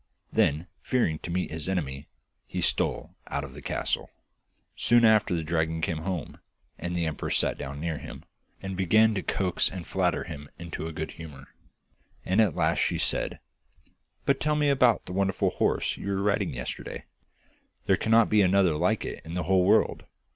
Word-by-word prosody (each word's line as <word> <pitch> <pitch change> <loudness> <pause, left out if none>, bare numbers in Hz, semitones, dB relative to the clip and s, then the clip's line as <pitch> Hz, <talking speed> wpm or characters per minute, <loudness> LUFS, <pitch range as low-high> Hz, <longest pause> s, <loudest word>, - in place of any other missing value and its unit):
Then, 75 +4 +2 0.2
fearing 85 -12 0
to - - -7
meet 90 0 -1
his 80 +2 -3
enemy, 75 -6 -3 0.4
he - - -4
stole - - 0
out 70 - -2
of 70 -2 -8
the 75 - -10
castle. - - -2 0.7
Soon 120 0 +4
after 110 -4 +4
the 80 - -2
dragon 80 0 0
came 80 0 -1
home, 90 -1 -4 0.4
and 85 0 -3
the 85 - 0
empress 80 -2 -1
sat - - +1
down 70 +1 -6
near 80 -1 -3
him, - - -10 0.4
and 95 -1 -4
began 110 +4 +4
to 95 - -1
coax 90 -1 0
and 90 -3 -7
flatter 90 -3 0
him 75 -4 -8
into 85 -2 -6
a - - -5
good 80 0 -5
humour, 75 -5 -11 0.8
and 95 +4 +3
at 100 -8 +2
last - - +1
she - - +1
said: - - 0 0.9
'But 140 - +2
tell 150 0 +1
me 150 -1 +2
about 125 -6 +3
that 90 - -6
wonderful 95 0 +1
horse - - 0
you - - -7
were 100 0 0
riding 100 0 0
yesterday. - - -6 0.8
There - - +4
cannot 115 0 +4
be 105 -1 +4
another 95 -2 +4
like 90 +8 +1
it - - -6
in 80 +2 -7
the 90 - -1
whole 90 +1 +3
world. 105 +3 +3
90 Hz, 185 wpm, -27 LUFS, 80-100 Hz, 0.9 s, Soon